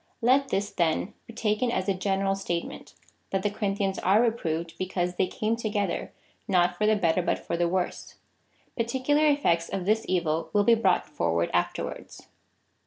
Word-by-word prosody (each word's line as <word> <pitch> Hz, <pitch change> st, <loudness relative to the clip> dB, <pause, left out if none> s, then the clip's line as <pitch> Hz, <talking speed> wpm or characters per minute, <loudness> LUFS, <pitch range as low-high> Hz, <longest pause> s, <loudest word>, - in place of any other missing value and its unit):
Let 270 Hz, +3 st, +4 dB
this 200 Hz, +1 st, -1 dB
then 170 Hz, +3 st, 0 dB
be 230 Hz, -, -10 dB
taken 220 Hz, +2 st, 0 dB
as 185 Hz, -4 st, -1 dB
a 195 Hz, -, +3 dB
general 195 Hz, +1 st, 0 dB
statement, 175 Hz, -3 st, -5 dB, 0.3 s
that 190 Hz, -1 st, -1 dB
the 205 Hz, -, +1 dB
Corin 205 Hz, -1 st, -2 dB
thians 195 Hz, -1 st, -1 dB
are 195 Hz, +4 st, +4 dB
reproved, 170 Hz, -8 st, -1 dB
because 180 Hz, -1 st, -1 dB
they 185 Hz, -, +2 dB
came 220 Hz, +4 st, -1 dB
together 210 Hz, -3 st, -2 dB, 0.4 s
not 180 Hz, -3 st, +3 dB
for 210 Hz, +4 st, +1 dB
the 215 Hz, -, +4 dB
better 180 Hz, -3 st, +2 dB
but -, -, 0 dB
for -, -, -4 dB
the 170 Hz, 0 st, +1 dB
worse. 180 Hz, 0 st, -3 dB, 0.6 s
Particular 265 Hz, +6 st, +1 dB
effects 170 Hz, -, +2 dB
of 185 Hz, -2 st, -3 dB
this 220 Hz, +3 st, +2 dB
evil 165 Hz, -3 st, 0 dB
will 205 Hz, -, +4 dB
be 235 Hz, -, +5 dB
brought 195 Hz, -6 st, +2 dB
forward 85 Hz, -, -1 dB
afterwards. 85 Hz, 0 st, -3 dB
195 Hz, 175 wpm, -27 LUFS, 175-220 Hz, 0.6 s, be